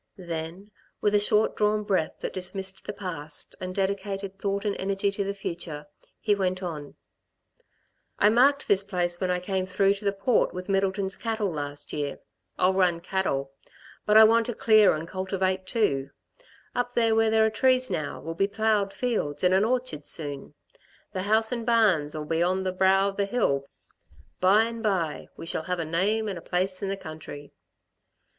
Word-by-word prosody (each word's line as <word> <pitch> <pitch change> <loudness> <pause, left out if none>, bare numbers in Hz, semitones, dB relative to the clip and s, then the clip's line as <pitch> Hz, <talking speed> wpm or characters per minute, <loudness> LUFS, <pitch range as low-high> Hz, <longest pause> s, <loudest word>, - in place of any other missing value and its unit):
Then, 170 +3 -6 0.3
with 210 - +1
a 205 - +5
short 210 +1 +2
drawn 210 0 +1
breath 190 -6 -1
that - - -4
dismissed 190 +1 -4
the - - -2
past 175 -7 -6
and 185 0 -5
dedicated 195 0 -2
thought 200 +1 -2
and 205 - 0
energy 195 +1 0
to 200 0 -2
the 200 +1 -3
future, 170 -6 -5 0.3
he 210 - +2
went 185 -1 -1
on: 150 -5 -6 1.2
"I 210 - +5
marked 275 +5 +4
this 195 -1 +4
place 180 -3 -2
when 185 - 0
I 180 0 +1
came 185 0 -2
through 195 +1 +3
to 200 +1 -8
the 200 - +3
Port 200 +3 +1
with 180 +2 -6
Middleton's 195 0 0
cattle, 220 -4 -2
last 145 -1 -5
year. 145 -1 -3 0.4
I'll 185 +1 +3
run 180 -3 +2
cattle 170 -7 -2 0.6
but 210 0 +6
I 220 - +10
want 230 +1 +4
to 240 - -3
clear 215 -3 +5
and 155 +2 -5
cultivate 190 0 -2
too. 140 - 0 0.6
Up 245 0 -2
there 230 -1 +3
where 225 0 +3
there 220 0 +4
are 220 - +1
trees 255 +2 +2
now 155 - -3
will 165 +2 -5
be 195 +4 +1
ploughed 210 -1 +1
fields 200 - -1
and 180 0 +4
an 190 +2 +4
orchard 245 - -1
soon. 145 -4 -5 0.6
The 185 - -2
house 220 +3 +2
and 235 -2 -2
barns'll 180 -11 +2
be 165 +2 0
on 185 +2 +1
the 185 -1 -1
brow 190 +1 +3
of 195 - -9
the 200 - +1
hill. 140 - 0 0.7
By 195 +4 +5
and 230 0 -4
by... 185 -8 -1
we - - -8
shall 160 - -3
have 180 - 0
a 165 - -2
name 200 +7 0
and 190 -4 -4
a - - -14
place 185 +2 -1
in 195 - -2
the 195 - -2
country." 155 -4 -9
195 Hz, 185 wpm, -26 LUFS, 175-210 Hz, 1.2 s, I